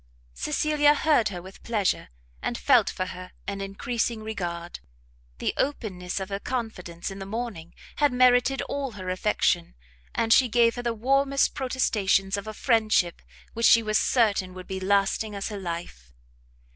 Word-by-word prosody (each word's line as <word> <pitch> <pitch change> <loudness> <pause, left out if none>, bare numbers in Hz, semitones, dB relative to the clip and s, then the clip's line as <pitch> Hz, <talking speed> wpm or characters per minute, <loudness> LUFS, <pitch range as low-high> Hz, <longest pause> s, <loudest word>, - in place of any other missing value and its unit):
Cecilia 295 - +2
heard 295 -9 +3
her 175 -3 -7
with 190 +1 -13
pleasure, 210 - -1 0.3
and 240 - -2
felt 250 -6 +4
for 185 - -3
her 185 0 -9
an 200 -1 -4
encreasing 220 +3 -2
regard. 175 -5 -5 0.6
The - - -1
openness 195 -10 -2
of 190 0 -5
her 200 0 -3
confidence 200 -8 -4
in 195 - -8
the 195 - -6
morning 210 -6 -5 0.2
had 290 -2 +3
merited 250 +1 +4
all 275 -4 -4
her 185 -2 -5
affection, 185 - 0 0.4
and 225 0 +3
she 255 -2 +5
gave 230 0 +4
her 245 - -5
the 235 -1 -2
warmest 275 +4 +2
protestations 205 -7 +1
of 200 +1 -5
a 215 - -5
friendship 215 -8 +2 0.3
which 230 0 +3
she 230 - +6
was 215 0 +2
certain 200 -6 +1
would 185 0 -8
be 190 -1 -5
lasting 200 +2 +1
as 200 +2 -3
her 205 -2 -5
life. 170 - -6
215 Hz, 160 wpm, -26 LUFS, 185-245 Hz, 0.6 s, she